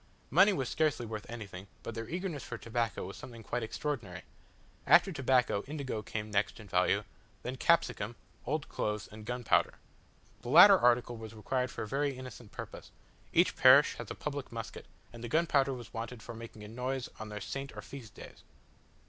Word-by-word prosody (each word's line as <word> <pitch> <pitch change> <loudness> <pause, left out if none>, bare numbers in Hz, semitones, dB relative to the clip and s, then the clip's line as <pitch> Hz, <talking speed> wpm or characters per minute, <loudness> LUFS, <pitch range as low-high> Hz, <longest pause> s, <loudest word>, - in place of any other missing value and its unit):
Money 190 +7 +7
was 135 -10 -1
scarcely 150 -3 +1
worth 110 -2 -6
anything, 100 -5 -7 0.2
but 115 - -5
their 115 0 -5
eagerness 175 -4 -3
for 115 - -6
tobacco 115 -2 -2
was 95 - -7
something 120 -3 -10
quite 120 - -2
extraordinary. 110 - -4 0.6
After 195 - +7
tobacco, 130 - +2
indigo 140 -7 -3
came 105 0 -5
next 100 +2 0
in 110 - -11
value; 90 +2 +2 0.4
then 125 - -3
capsicum, 125 -7 +2 0.3
old 150 +2 -1
clothes, 105 -1 -2
and 110 0 -10
gunpowder. 125 -1 +2 0.7
The 120 - -7
latter 180 +8 +10
article 120 -1 +3
was 110 0 -9
required 125 +4 -1
for - - -5
a - - -5
very 140 +2 -1
innocent 125 -4 -9
purpose: - - -8 0.4
each - - +4
parish - - +7
has - - -6
a - - -5
public - - -5
musket, - - -7 0.3
and 115 0 -9
the 120 - -4
gunpowder 145 -2 +3
was 120 -3 -7
wanted 115 0 -5
for - - -7
making 115 -2 -10
a - - -8
noise 125 +3 -3
on 110 - -6
their 105 0 -5
saint 135 +5 -6
or - - -6
feast 125 -7 -10
days. - - -12
120 Hz, 180 wpm, -32 LUFS, 110-135 Hz, 0.7 s, latter